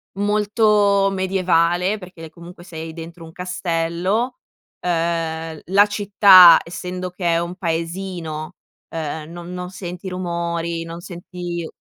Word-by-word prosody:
molto 205 -1 +2
medievale, 185 0 +1
perché, 180 -3 -12
ehm, 160 - -8
comunque 170 +2 -13
sei 160 -2 -7
dentro 165 +1 -9
un 160 - -11
castello. 180 +6 -2 0.4
Ehm, 165 -2 -2
la 200 +3 +5
città, 200 -3 +7
essendo 180 +1 -6
che 175 -2 -1
è 165 - +2
un 170 +1 -4
paesino, 170 -1 -4 0.3
ehm, 155 -1 -5
non 175 +1 -8
non 180 0 -5
senti 180 0 -7
rumori, 170 -2 -3
non 165 +1 -8
senti 175 -1 -6
175 Hz, 120 wpm, -21 LUFS, 165-190 Hz, 0.4 s, città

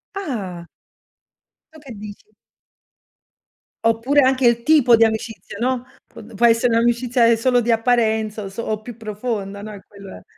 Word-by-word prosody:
Ah. 200 - -5 1.1
Tu 315 - -14
che 275 -4 -13
dici? 210 - -12 1.5
Oppure 235 +6 +3
anche 260 -1 +3
il 235 0 +2
tipo 265 -5 +5
di 230 - +4
amicizia, 220 -3 -3
no, 250 0 -1 0.2
p 225 +1 -14
può 235 - +2
essere 230 +1 +3
un'amicizia 235 0 +2
solo 245 +2 +2
di 240 0 -3
apparenza 220 -2 +1
o - - -6
so 215 +1 -4
più 240 0 -10
profonda, 210 -2 -5
no, 215 0 -8
è 200 - -10
quello 200 -1 -12
è. - - -22
230 Hz, 150 wpm, -20 LUFS, 215-245 Hz, 1.5 s, tipo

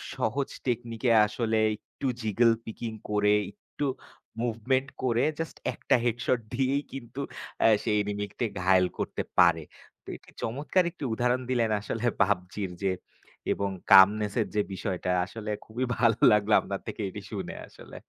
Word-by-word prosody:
সহজ 135 +5 -1 0.2
টেকনিকে 120 -1 -1 0.2
আসলে 110 +1 -1 0.2
একটু 120 +5 -7
জিগল 115 +2 +3
পিকিং 115 +1 -5 0.2
করে। 105 0 +3 0.2
একটু 125 +7 -6 0.6
মুভমেন্ট 125 +4 0
করে 120 -2 +2 0.2
জাস্ট 165 - -4 0.2
একটা - - +1
হেড 120 -1 +1
শট 125 - +2
দিয়েই 135 +3 +1
কিন্তু 130 0 -6 0.4
আ - - +8 0.2
সেই 110 - +1
এনিমিকে 105 +3 -3
ঘায়েল 90 0 +4
করতে - - -2 0.2
পারে। 85 -3 +5 0.4
তো - - -35
এটি - - -16
চমৎকার 145 +10 +1
একটি 165 - -10
উদাহরণ 125 +2 +1
দিলেন 120 -3 +1
আসলে 110 +3 -4 0.2
পাবজির 95 -1 0
যে। 95 -1 +2 0.6
এবং 100 0 -2 0.2
calmness 100 +2 +7
এর - - -1
যে 105 - +4
বিষয়টা 95 -2 -2
আসলে 105 +2 -6
খুবই 120 +4 -3
ভালো 115 -2 +4
লাগলো 105 0 +3
আপনার 100 -1 -4
থেকে - - -5
এটি - - -8
শুনে - - -5
আসলে। - - -14
110 Hz, 150 wpm, -28 LUFS, 100-125 Hz, 0.6 s, আ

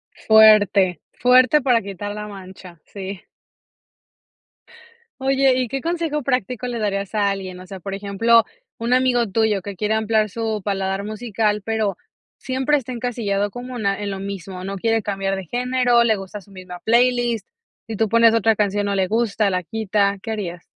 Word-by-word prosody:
Fuerte. 205 -4 +5
Fuerte 255 +4 +4
para 245 -3 +3
quitar 200 +1 -6
la 210 0 -6
mancha, 185 -3 -12
sí. 195 -1 -7 2.0
Oye, 270 0 +3
¿y 255 -1 0
qué 270 +4 -4
consejo 330 -2 -2
práctico 250 -1 -2
le 240 -1 -3
darías 200 -2 -2
a 205 -1 +2
alguien?, 190 -2 -5
o 185 - -11
sea, 190 0 -9
por 195 +2 -6
ejemplo, 205 +4 +3 0.3
un 230 +2 -2
amigo 250 -2 +3
tuyo 210 -1 +1
que 200 0 -6
quiere 210 +4 -1
ampliar 220 -1 +1
su 220 -1 -3
paladar 195 -1 -2
musical, 215 0 -1
pero 220 -4 -1 0.4
siempre 265 +3 0
está 255 -3 -4
encasillado 220 -5 -2
como 250 +3 -8
una 200 -3 -1
en 205 -1 -3
lo 190 - -5
mismo, 195 -2 -6
no 195 +1 -5
quiere 225 +3 0
cambiar 195 -1 -2
de 190 -1 -6
género, 245 +2 +2
le 225 -2 +3
gusta 195 +1 -7
su 200 +1 -20
misma 185 -1 -9
playlist, 240 -1 +2 0.4
si 225 - -4
tú 220 +1 +1
pones 230 +1 +5
otra 225 0 +3
canción 205 0 0
no 200 - -1
le 190 -1 0
gusta, 220 -1 +1
la 180 -1 -2
quita, 200 0 0
¿qué - - -6
harías? 180 -6 -5
210 Hz, 175 wpm, -21 LUFS, 195-235 Hz, 2.0 s, Fuerte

